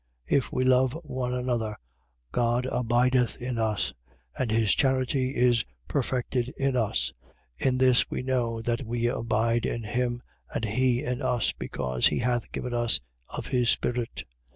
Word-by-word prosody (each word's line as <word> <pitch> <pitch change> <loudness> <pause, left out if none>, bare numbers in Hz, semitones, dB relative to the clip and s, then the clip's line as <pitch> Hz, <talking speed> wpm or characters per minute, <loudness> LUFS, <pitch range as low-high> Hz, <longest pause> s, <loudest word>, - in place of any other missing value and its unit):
If 135 - +1
we 130 - +1
love 130 +2 +4
one 130 -4 -3
another, 120 -4 -1 0.6
God 120 - +1
abideth 125 0 +2
in 125 -1 -3
us: 110 -2 0 0.4
and 125 - -1
his 110 -1 +3
charity 130 0 +1
is 120 -2 +4 0.2
perfected 125 -1 -1
in 135 -1 +1
us. 100 - 0 0.5
4:13. - - +1
In 130 -1 +2
this 130 -1 +4
we - - -3
know 120 -3 -1
that 120 +2 -1
we 120 0 -2
abide 115 -1 +1
in 115 - -3
him, 120 +2 -1 0.3
and 115 - -2
he 125 +3 +1
in 125 0 -2
us: 120 -2 +1
because 65 -1 0
he - - 0
hath 120 -1 0
given 125 - -4
us 120 -8 +2 0.3
of - - -5
his 125 -2 +1
spirit. 120 -1 -1
120 Hz, 155 wpm, -27 LUFS, 115-130 Hz, 0.6 s, love